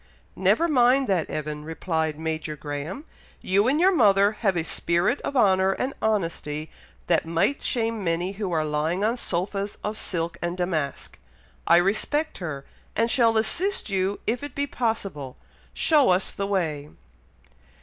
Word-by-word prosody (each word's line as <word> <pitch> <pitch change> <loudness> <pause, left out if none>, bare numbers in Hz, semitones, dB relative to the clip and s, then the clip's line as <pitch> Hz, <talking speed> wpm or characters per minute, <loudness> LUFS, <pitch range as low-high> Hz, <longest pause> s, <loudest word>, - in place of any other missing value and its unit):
"Never 335 - +3
mind 260 -2 +4
that, 180 -5 +1
Evan," 150 0 -4
replied 160 -1 -2
Major 155 -1 -3
Graham. 150 - -6 0.3
"You 200 +4 +2
and 285 +4 +2
your 370 +3 +5
mother 200 - +5
have 205 -4 0
a 165 - +1
spirit 170 - 0
of 280 - -3
honour 190 -4 +4
and 260 +6 -3
honesty 165 -7 -2 0.3
that 165 -1 +1
might 170 +12 +1
shame 225 -3 -1
many 175 +2 0
who 200 -2 -4
are 160 -2 +1
lying 155 +5 -1
on 225 +3 +2
sofas 195 -1 -2
of 215 +1 -3
silk 170 -1 -3
and 175 +1 -2
damask. 160 -6 -3 0.5
I 170 - +7
respect 215 - +1
her, 140 -6 -5 0.3
and 230 +2 +1
shall 230 -4 +3
assist 345 - 0
you 195 +1 0
if 240 +4 -1
it 290 -2 -7
be 285 - 0
possible. 200 - -3 0.4
Show 295 -7 +4
us 185 +1 +2
the 200 - -3
way." 155 -7 -1
190 Hz, 155 wpm, -25 LUFS, 165-225 Hz, 0.5 s, I